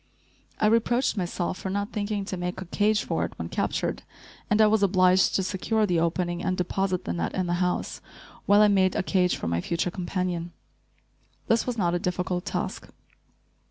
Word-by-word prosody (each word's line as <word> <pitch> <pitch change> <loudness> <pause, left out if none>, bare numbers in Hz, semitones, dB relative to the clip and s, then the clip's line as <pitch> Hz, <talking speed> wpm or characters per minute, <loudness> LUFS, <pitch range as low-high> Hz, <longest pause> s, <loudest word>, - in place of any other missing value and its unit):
I - - +2
reproached 230 +4 +2
myself 180 -1 -2
for 190 - -4
not 200 +2 -2
thinking 205 -1 -2
to 195 - -4
make 180 +1 -4
a 190 - -6
cage 210 +4 +1
for - - -1
it - - -4
when - - -5
captured, - - -1 0.5
and 210 - +2
I 215 - +7
was 215 0 +3
obliged 185 -1 +4
to 190 - +2
secure 210 +4 0
the 175 -4 +1
opening 175 +1 -1
and 185 - 0
deposit 185 +1 -1
the 85 - -2
net 85 -1 -2
in 185 - 0
the 175 +1 -1
house, 180 0 -1 0.5
while 205 +1 +6
I - - +6
made 190 -2 +3
a - - 0
cage 180 -2 +2
for - - -5
my 85 0 0
future 170 - -1
companion. 175 -2 -3 0.9
This 225 +1 +1
was 245 -2 -2
not 175 -4 +1
a 175 - +1
difficult 180 +1 -2
task. - - -4
185 Hz, 195 wpm, -26 LUFS, 175-205 Hz, 0.9 s, I